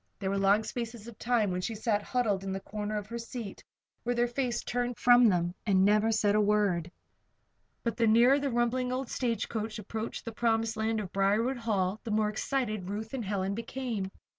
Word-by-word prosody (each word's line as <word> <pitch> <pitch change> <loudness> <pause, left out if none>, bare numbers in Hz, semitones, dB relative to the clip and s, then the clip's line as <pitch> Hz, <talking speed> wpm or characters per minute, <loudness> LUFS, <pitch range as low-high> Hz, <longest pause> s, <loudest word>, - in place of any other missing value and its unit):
There 195 -1 -2
were 200 - 0
long 200 +2 +4
spaces 230 -1 -5
of 235 - -11
time 225 -5 +1
when 180 0 -2
she 225 +4 -3
sat 210 -1 0
huddled 210 -4 0
in 195 - -3
the 190 - -2
corner 210 +2 -4
of 205 - -4
her 235 +3 -6
seat, 230 -3 -7 0.4
with 245 0 -1
her 240 - +4
face 240 0 -2
turned 245 -1 -2
from 245 -1 +6
them, 175 -2 +1
and 190 -3 +3
never 210 +2 +4
said 210 -2 +2
a 210 - +4
word. 200 -5 +2 0.9
But 235 - -2
the 230 -1 +3
nearer 240 +5 +6
the 280 0 -1
rumbling 245 +1 0
old 255 0 -3
stagecoach 225 -3 -2
approached 220 +2 -5
the 230 - -4
promised 225 0 +1
land 220 0 0
of 195 -3 -6
Briarwood 210 +7 +2
Hall 205 -3 0
the 235 - -6
more 215 0 +2
excited 215 -4 -2
Ruth 215 +3 -5
and 260 -3 -2
Helen 195 -1 -1
became. 230 -3 -4
220 Hz, 200 wpm, -30 LUFS, 205-240 Hz, 0.9 s, from